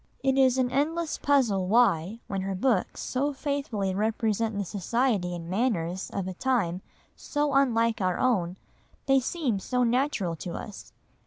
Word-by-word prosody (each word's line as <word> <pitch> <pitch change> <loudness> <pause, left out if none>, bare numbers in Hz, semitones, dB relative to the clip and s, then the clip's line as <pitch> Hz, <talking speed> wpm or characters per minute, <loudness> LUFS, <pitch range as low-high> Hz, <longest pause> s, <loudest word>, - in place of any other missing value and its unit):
It 270 -1 +2
is 265 -1 +4
an 250 -1 +1
endless 315 +4 -1
puzzle 235 -10 +2
why, 215 -2 +2
when 195 -1 -3
her 195 0 -3
books 210 -1 0
so 280 +3 -1
faithfully 270 -9 -2
represent 220 +1 0
the 200 - -1
society 200 -1 0
and 165 -1 -7
manners 185 -3 -1
of 195 -2 -3
a 185 - -4
time 185 -6 0 0.3
so 295 -1 -1
unlike 230 -5 +2
our 185 -1 +1
own, 190 -8 +1 0.5
they 270 -1 +4
seem 260 - -1
so 250 +5 0
natural 240 - 0
to 170 +2 -6
us. 210 - -8
225 Hz, 155 wpm, -27 LUFS, 190-265 Hz, 0.5 s, is